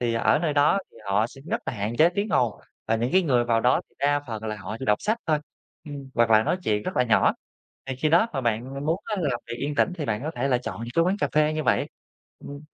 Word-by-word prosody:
thì 120 -1 0
ở 115 - +3
nơi 155 -2 0
đó 145 +6 +4
thì - - -22
họ 100 +3 +2
sẽ 135 +3 -14
rất - - 0
là - - -2
hạn 110 +1 -3
chế 165 +2 +6
tiếng 200 +4 -2
ồn, 120 - +1 0.3
và 115 - +2
những 120 +3 -1
cái 190 0 +5
người 125 -7 +2
vào 115 -1 +2
đó 125 +2 +3
thì - - -34
đa 145 0 +1
phần 110 -2 -6
là 110 -1 -3
họ 105 +2 -6
chỉ 130 - -5
đọc 105 0 +3
sách 220 +2 0
thôi, 155 -2 +2 0.5
ừm, 140 -3 -8
hoặc 115 -1 +3
là 110 0 +6
nói 175 - 0
chuyện 105 -6 0
rất - - -5
là 125 - +4
nhỏ. 115 - +4 0.5
Thì 135 - -4
khi 150 +4 0
đó 175 +8 +4
mà 135 - -1
bạn 125 +5 -2
muốn 165 +4 +1
á, 215 - -2
làm 140 -8 -1
việc 115 - -5
yên 145 +3 -3
tĩnh 180 - +2
thì 150 - -3
bạn 110 +1 -2
có 155 - -3
thể 125 +3 0
là 125 - +3
chọn 125 - -6
những 120 - -6
cái 165 - +5
quán 185 +3 +1
cà - - +1
phê 155 0 +3
như 155 - -2
vậy. - - +2 0.5
Ừm. 145 0 -9
135 Hz, 285 wpm, -25 LUFS, 115-155 Hz, 0.5 s, chế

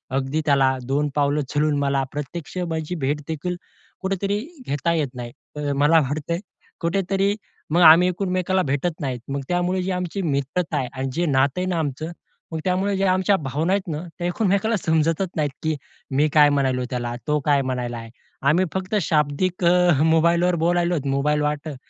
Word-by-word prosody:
अगदी 135 +3 0
त्याला 135 -2 +3
दोन 145 +2 +1
पावलं 145 0 +2
चालून 150 0 +1
मला 140 -1 +1
प्रत्यक्ष 150 +5 -6
माझी 160 +2 -3
भेटदेखील 150 +5 -2 0.5
कुठेतरी 195 +1 -1 0.3
घेता 155 +4 0
येत 150 -5 0
नाही. 120 -1 -6 0.2
तर 145 -1 -2
मला 160 +2 +6
वाटत 145 +3 -3 0.5
कुठेतरी 195 +3 +1 0.4
मग 175 - +4
आम्ही 165 +2 +8
एकमेकानां 185 0 0
भेटत 150 +5 -1
नाहीत. 130 -4 -2
मग 140 - -2
त्यामुळे 180 +1 +1
जे 190 - -2
आमची 180 +1 -2
मित्रता 150 +2 -1
आहे 130 -3 -1
आणि 135 0 -3
जे 175 +5 0
नातं 140 +3 +2
आहे - - -1
ना 175 - 0
आमचं, 155 +2 -3 0.4
मग 160 - -3
त्यामुळे 190 +2 +1
ज्या 195 -1 +2
आमच्या 190 +2 +3
भावना 155 +6 -1
आहेत 200 -2 -1
ना, 150 - -4 0.2
त्या 175 - -1
एकमेकानां 200 +4 +1
समजतच 165 +1 +1
नाहीत, 150 -2 +1
की 155 -1 0 0.4
मी 150 +3 +4
काय 150 -1 +7
म्हणालो 130 -3 +1
त्याला? 120 -1 -2
तो 150 0 +2
काय 145 -2 +4
म्हणायलाय? 120 -3 -4 0.4
आम्ही 180 +5 +3
फक्त 190 +2 -2
शाब्दिक 155 +4 0 0.4
मोबाईलवर 170 +2 +3
बोलायलोत, 175 -3 +1
मोबाईल 150 +2 +1
वाटं 150 0 -2
155 Hz, 165 wpm, -23 LUFS, 140-180 Hz, 0.5 s, आम्ही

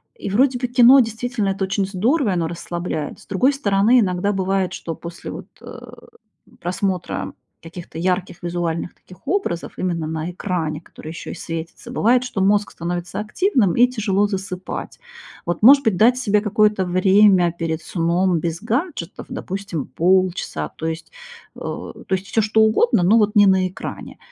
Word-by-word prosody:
И, 435 - -6
вроде 250 +5 +2
бы, 250 - -1
кино, 245 +2 +7
действительно, 225 -2 -1
это 195 0 -2
очень 195 +1 -1
здорово, 225 - +1
и - - +1
оно 170 -2 0
расслабляет. 170 -2 -5
С - - -17
другой 250 +9 +2
стороны, 220 -2 +3
иногда 190 -1 +1
бывает, 190 -1 0
что 165 - -5
после, 170 +2 -8
вот, - - -8
э, - - -10 0.8
просмотра 185 0 -3 0.3
каких-то 165 0 -9
ярких 180 0 -1
визуальных 175 -1 -3
таких 185 +9 -18
образов, 310 - -2
именно 170 -4 -2
на 160 +2 -4
экране, 170 -4 -3
которые 160 -1 -11
еще 165 - -7
и - - -7
светятся, 165 +8 -7
бывает, 245 +1 +3
что 245 -6 -3
мозг 205 +2 +2
становится 175 +2 -4
активным, 210 - +1
и 245 +1 +6
тяжело 205 -5 0
засыпать. 190 -2 -5 0.5
Вот, 175 -1 -2
может 275 +5 +8
быть, 220 -5 +2
дать 235 +7 +4
себе 210 -5 +1
какое-то 210 -2 +2
время 185 0 +4
перед 165 -1 -4
сном 170 +1 +1
без 165 +3 -4
гаджетов, 235 - -3
допустим, 190 -6 -5
полчаса. 180 - 0
То 160 - -4
есть, 160 0 -5 0.4
э, - - -11
то - - -7
есть 190 +1 -6
всё 225 - +1
что 220 +1 +2
угодно, 220 - +3
но 205 +6 +5
вот 210 -1 +1
не 205 -1 +7
на 190 -1 +3
экране. 185 - -8
190 Hz, 165 wpm, -21 LUFS, 175-220 Hz, 0.8 s, может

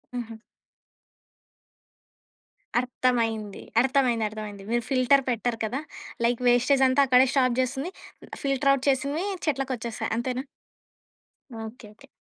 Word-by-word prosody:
హుహు. 230 -2 -5 2.4
అర్థమైంది. 230 -4 -1 0.2
అర్థమైంది. 255 -4 +2
అర్థమైంది. 210 -2 -8
మీరు 240 -1 +1
ఫిల్టర్ 270 +1 +4
పెట్టరు 235 -1 -1
కదా, 255 +7 -3 0.4
లైక్ 240 +1 +1
వేస్టేజ్ 260 +3 +4
అంతా 260 +2 +3
అక్కడే 255 +1 +6
స్టాప్ 255 -3 +2
జేస్తుంది, 270 +6 -1 0.5
ఫిల్టర్‌ 275 0 +2
అవుట్ 275 0 -2
చేసినవి 280 +6 0 0.2
చెట్లకొచ్చేస్తాయి 255 -7 -2
అంతేనా? 255 +2 -2 1.2
ఓకే. 220 0 -10
ఓకే. 275 +5 -19
255 Hz, 105 wpm, -26 LUFS, 235-270 Hz, 2.4 s, అక్కడే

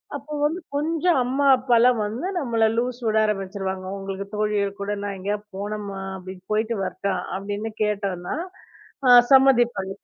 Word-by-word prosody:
அப்ப 300 -1 -6
வந்து 320 +4 0 0.2
கொஞ்சம் 325 +3 +1
அம்மா, 270 +3 0
அப்பா 250 -1 0
எல்லாம் 245 -1 +4
வந்து 235 - -4
நம்மள 235 -5 0
லூஸ் 245 +1 -1
விட 220 0 +2
ஆரம்பிச்சுருவாங்க. 195 -2 -3
உங்களுக்கு 195 0 -5
தோழிகள் 205 -2 -1
கூட 200 +1 -2
நான் 200 -1 -3
எங்கயாவது 205 +2 -3
போனோமா 200 -1 -5 0.2
அப்படின்னு 185 0 -10
போயிட்டு 220 +2 0
வரட்டா 195 +1 -2 0.2
அப்படின்னு 205 +3 -4
கேட்டோம்னா, 200 -3 -2 0.7
அ - - +6 0.2
சம்மதிப்பாங்க. 240 -7 +4
210 Hz, 145 wpm, -23 LUFS, 195-245 Hz, 0.7 s, அ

